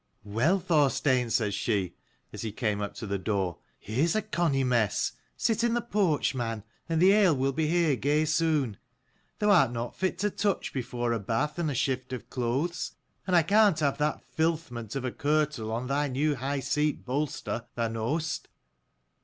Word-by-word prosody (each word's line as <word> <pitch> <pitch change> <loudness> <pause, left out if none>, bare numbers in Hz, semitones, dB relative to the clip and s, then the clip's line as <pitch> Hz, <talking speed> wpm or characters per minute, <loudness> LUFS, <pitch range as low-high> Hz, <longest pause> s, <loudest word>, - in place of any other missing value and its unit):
"Well, 120 - +2
Thorstein," 145 -7 +2
says 105 -3 +1
she, 95 -6 -1 0.4
as - - -6
he 110 - -3
came 105 -2 -1
up 100 - -4
to 115 - -6
the 100 -1 -2
door, 95 -2 -1 0.2
"here's 135 - 0
a 215 - +1
conny 170 -10 +1
mess. 115 -5 +1 0.3
Sit 230 -1 +1
in 235 0 +2
the - - +2
porch, 195 -13 +1
man, 115 -4 -3 0.3
and 165 -1 +1
the 185 +3 +6
ale 200 -6 +5
will 135 +1 +1
be 155 +3 0
here 165 -3 +3
gey 145 +4 +1
soon. 155 -8 +1 0.6
Thou 210 -1 +3
art 135 -11 +5
not 120 0 -4
fit 185 -2 -1
to 205 +3 0
touch 200 -1 -1
before 120 -2 -2
a 115 - -1
bath 115 - -1
and 165 -3 0
a 140 - -2
shift 130 +1 -1
of 125 - -7
clothes: 135 +8 -1 0.3
and 180 - +2
I 170 - +6
can't 200 -1 +4
have 140 -2 +1
that 150 +1 0
filthment 155 -9 -2
of 135 -1 -2
a 130 - -1
kirtle 150 -6 0
on 115 +3 -2
thy 140 +3 0
new 145 +3 +1
high 135 +2 -2
seat 150 +3 0
bolster, 130 -3 -3
thou 115 -1 0
know'st. 135 +9 -2
140 Hz, 185 wpm, -28 LUFS, 115-165 Hz, 0.6 s, the